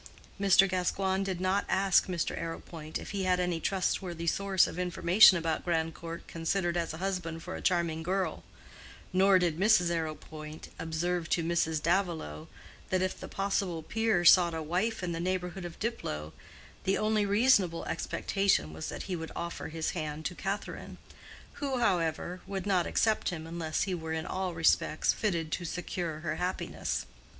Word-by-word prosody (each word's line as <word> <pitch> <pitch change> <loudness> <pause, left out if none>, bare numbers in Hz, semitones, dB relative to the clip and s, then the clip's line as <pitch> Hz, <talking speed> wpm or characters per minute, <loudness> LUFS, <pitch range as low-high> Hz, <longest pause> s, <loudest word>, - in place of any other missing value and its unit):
Mr. 195 -1 +6
Gascoigne 190 +1 0
did 190 -2 -3
not 185 +2 +1
ask 195 -1 +4
Mr. 175 -3 -1
Arrowpoint 165 -1 -5
if - - -8
he 195 -2 -2
had 180 -1 +2
any 180 -2 0
trustworthy 180 -2 -1
source 195 +2 +3
of 170 - -5
information 180 +2 +6
about 165 -1 -1
Grandcourt 165 0 -2
considered 170 +1 -1
as 170 -1 -1
a 160 - -6
husband 175 -3 -3
for 185 - -5
a - - -6
charming 170 -3 +1
girl; 185 -1 -1 0.7
nor 190 +1 +6
did 175 -3 0
Mrs. 190 -4 +4
Arrowpoint 155 -1 -5
observe 165 +1 -2
to 170 - +1
Mrs. 160 -2 0
Davilow 165 - -1 0.4
that 185 0 +1
if 185 - -2
the - - -7
possible 195 -4 -1
peer 220 -3 +1
sought 170 -1 +7
a 160 - -3
wife 185 +7 -1
in 175 - -1
the 165 - -3
neighborhood 180 +1 -2
of 170 -1 -8
Diplow, 80 - -3 0.5
the 195 - +2
only 215 0 +2
reasonable 200 -5 +3
expectation 195 - 0
was 80 0 -5
that - - -5
he 185 - -3
would 160 -1 -6
offer 170 0 -4
his 160 0 -2
hand 155 -2 -4
to - - -1
Catherine, 195 +3 -5 0.6
who, 275 -2 0
however, 180 -4 0
would 195 -2 -4
not 185 -4 +2
accept 220 -1 +2
him 160 -3 -5
unless 165 -1 -2
he 195 - -2
were 160 -2 -4
in 160 +1 -2
all 185 -2 -3
respects 160 -1 +3
fitted 170 -7 -1
to 175 - -2
secure 170 -2 -4
her 165 - -2
happiness. 180 +1 -2
175 Hz, 165 wpm, -30 LUFS, 165-190 Hz, 0.7 s, sought